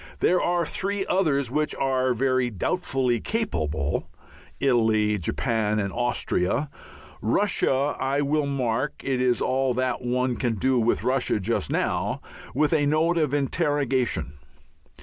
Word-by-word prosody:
There 180 - +3
are 175 -1 +1
three 195 +4 -2
others 140 -9 +1
which 150 +2 0
are 130 -2 +1
very 130 0 +1
doubtfully 125 - -1
capable: 80 - -2 0.5
Italy, 110 -5 +2
Japan, 110 +4 0
and 100 -2 -2
Austria. 120 +2 0 0.5
Russia 140 - +1
I 135 +2 0
will 145 +1 +1
mark 130 0 -1
it 130 -2 0
is 125 -2 +2
all 130 -1 +1
that 130 0 -1
one 125 0 0
can 120 -3 0
do 130 +4 +2
with 115 +1 +1
Russia 130 -4 +1
just 95 - -1
now - - -1 0.4
with 150 +3 +2
a 145 -2 +3
note 165 +3 +2
of 150 -4 +1
interrogation. 135 - 0
130 Hz, 130 wpm, -25 LUFS, 115-145 Hz, 0.5 s, There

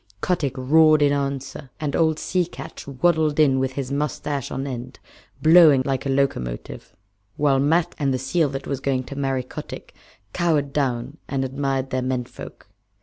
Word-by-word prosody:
Kotick 150 - -1
roared 155 +3 +5
in 145 0 +3
answer, 140 -1 -4
and 150 -2 -2
old 160 -2 +2
Sea 180 +2 0
Catch 170 - -10
waddled 155 +2 +1
in 135 -4 +4
with 130 0 -1
his 135 -1 -4
mustache 145 -1 -2
on 135 +1 -4
end, 125 -3 -6 0.5
blowing 155 -5 +7
like 135 0 -1
a - - -2
locomotive, 135 - -2 0.4
while 140 -2 +3
Matkah 160 +5 +2
and 140 -2 +1
the 130 - 0
seal 145 +4 0
that 135 0 -5
was 140 - -3
going 130 -1 -1
to 140 - -9
marry 135 -2 -1
Kotick 125 - -9 0.4
cowered 150 -5 0
down 130 0 -1
and 135 -1 -1
admired 135 0 -2
their 130 - 0
men 130 -1 -1
folk. - - -12
140 Hz, 170 wpm, -23 LUFS, 130-150 Hz, 0.5 s, blowing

